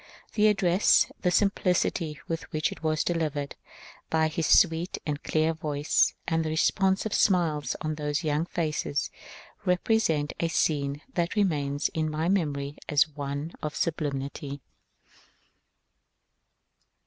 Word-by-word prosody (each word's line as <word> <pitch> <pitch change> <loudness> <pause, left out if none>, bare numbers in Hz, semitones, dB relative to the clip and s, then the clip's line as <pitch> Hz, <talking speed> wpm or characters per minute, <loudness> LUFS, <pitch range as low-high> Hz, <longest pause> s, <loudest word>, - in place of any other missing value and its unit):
The 215 -1 +4
address, 195 -2 +4
the 180 - +2
simplicity 180 -5 +1
with 165 0 -4
which 155 -2 0
it - - -9
was 155 -1 +1
delivered 155 -4 -2 0.5
by 160 0 +2
his 160 0 -1
sweet 165 +2 +4
and 150 -1 -2
clear 155 +1 +1
voice, 150 -2 +1
and 165 -1 +1
the 160 - -2
responsive 190 +6 +1
smiles 165 -6 +2
on 155 -1 -2
those 150 +1 -2
young 155 +2 0
faces, 155 -4 -2 0.5
represent 180 -5 +1
a 165 - +1
scene 145 -3 0
that 170 +2 -1
remains 145 -8 +1
in 155 -1 -1
my 155 +3 -1
memory 145 -7 -1
as 150 0 +4
one 145 +2 -5
of 150 0 -4
sublimity. 140 -3 -3
155 Hz, 125 wpm, -27 LUFS, 145-175 Hz, 0.5 s, The